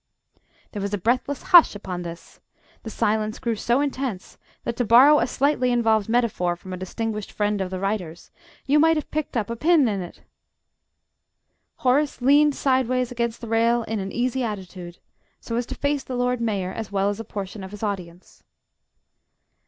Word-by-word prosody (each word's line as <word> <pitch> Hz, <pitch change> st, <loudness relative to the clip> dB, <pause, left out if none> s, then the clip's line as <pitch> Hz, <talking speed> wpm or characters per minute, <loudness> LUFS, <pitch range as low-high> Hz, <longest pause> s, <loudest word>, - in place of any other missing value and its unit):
There 205 Hz, -, -5 dB
was 200 Hz, +1 st, -2 dB
a -, -, -3 dB
breathless 250 Hz, +7 st, -1 dB
hush 345 Hz, -10 st, +7 dB
upon 185 Hz, -3 st, -5 dB
this; 170 Hz, 0 st, -10 dB, 0.4 s
the 225 Hz, -, -7 dB
silence 215 Hz, -1 st, -1 dB
grew 235 Hz, -3 st, -2 dB
so 240 Hz, +5 st, +1 dB
intense 265 Hz, -9 st, -4 dB, 0.2 s
that 235 Hz, -, -3 dB
to 245 Hz, -, +1 dB
borrow 260 Hz, +7 st, +7 dB
a 240 Hz, -, +1 dB
slightly 255 Hz, -1 st, +1 dB
involved 225 Hz, -3 st, +2 dB
metaphor 225 Hz, -7 st, +1 dB
from 185 Hz, +2 st, -10 dB
a -, -, -4 dB
distinguished 210 Hz, +3 st, -4 dB
friend 205 Hz, -1 st, -1 dB
of 190 Hz, -, -2 dB
the 185 Hz, 0 st, -5 dB
writer's, 185 Hz, -4 st, -4 dB, 0.3 s
you 290 Hz, +2 st, +3 dB
might 325 Hz, +1 st, +4 dB
have 305 Hz, -, -5 dB
picked 305 Hz, -4 st, -3 dB
up 220 Hz, 0 st, -2 dB
a -, -, -2 dB
pin 310 Hz, +1 st, +3 dB
in 200 Hz, -3 st, -1 dB
it! 175 Hz, -, -10 dB, 1.5 s
Horace 280 Hz, +3 st, +1 dB
leaned 285 Hz, +3 st, +4 dB
sideways 255 Hz, -2 st, +1 dB
against 235 Hz, -1 st, -3 dB
the 235 Hz, -, -7 dB
rail 230 Hz, +1 st, +2 dB
in 225 Hz, -1 st, -3 dB
an 195 Hz, 0 st, -4 dB
easy 250 Hz, +1 st, -1 dB
attitude, 185 Hz, -5 st, -6 dB, 0.4 s
so 230 Hz, -, -5 dB
as 240 Hz, 0 st, -1 dB
to -, -, -6 dB
face 285 Hz, -1 st, -1 dB
the 255 Hz, -, -6 dB
Lord 250 Hz, 0 st, 0 dB
Mayor, 200 Hz, -5 st, -2 dB
as 220 Hz, -3 st, -6 dB
well 200 Hz, 0 st, +1 dB
as 205 Hz, -, -7 dB
a -, -, -4 dB
portion 200 Hz, -1 st, -7 dB
of 190 Hz, -, -7 dB
his 210 Hz, +2 st, -10 dB
audience. 180 Hz, -4 st, -6 dB
225 Hz, 185 wpm, -23 LUFS, 200-255 Hz, 1.5 s, hush